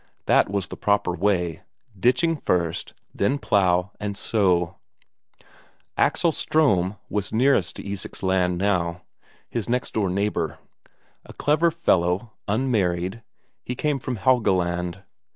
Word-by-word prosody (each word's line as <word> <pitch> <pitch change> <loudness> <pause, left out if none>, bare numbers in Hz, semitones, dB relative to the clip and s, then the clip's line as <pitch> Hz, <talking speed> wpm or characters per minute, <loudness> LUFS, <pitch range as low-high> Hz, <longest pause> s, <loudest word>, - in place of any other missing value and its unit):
That - - +4
was 100 -1 -1
the - - -8
proper 100 -3 +1
way; 90 -3 0 0.3
ditching 130 - +2
first, 85 - -1 0.2
then 130 +8 +1
plough 95 -6 +2
and 100 -1 -4
sow. 90 -5 +1 1.2
Axel 170 - +2
Ström 105 - +1
was 105 -2 -3
nearest 110 -6 +2
to - - -8
Isak's 100 -1 -6
land 90 -1 +1
now, 90 -3 0 0.4
his 115 -2 -4
next 125 +1 -1
door 100 -4 +1
neighbour. 100 +3 -1 0.7
A - - -13
clever 155 +3 +2
fellow, 100 - +1 0.2
unmarried, 100 -4 0 0.4
he 125 - -4
came 145 +1 0
from 125 0 -3
Helgeland. 95 -6 +1
100 Hz, 120 wpm, -24 LUFS, 90-120 Hz, 1.2 s, That